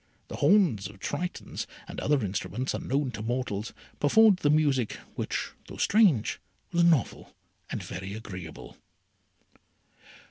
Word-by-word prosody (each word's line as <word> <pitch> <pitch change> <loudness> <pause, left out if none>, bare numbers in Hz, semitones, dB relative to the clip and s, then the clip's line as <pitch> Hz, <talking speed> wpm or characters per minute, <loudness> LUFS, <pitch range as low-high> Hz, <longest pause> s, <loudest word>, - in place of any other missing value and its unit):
The - - -6
horns 155 - +4
of 100 +1 -13
Tritons, 175 - -4 0.2
and - - -6
other 140 -6 +1
instruments 100 +6 -2
unknown 135 0 -1
to 110 - -6
mortals, 115 -2 -2 0.3
performed 210 +6 +6
the 150 - +1
music, 145 -6 +2 0.2
which, - - -3 0.2
though - - -9
strange, 200 - +3 0.3
was 170 -1 +3
novel 165 -7 +1 0.3
and - - -4
very 95 +3 -6
agreeable. 95 -7 -9
130 Hz, 120 wpm, -28 LUFS, 105-170 Hz, 0.3 s, performed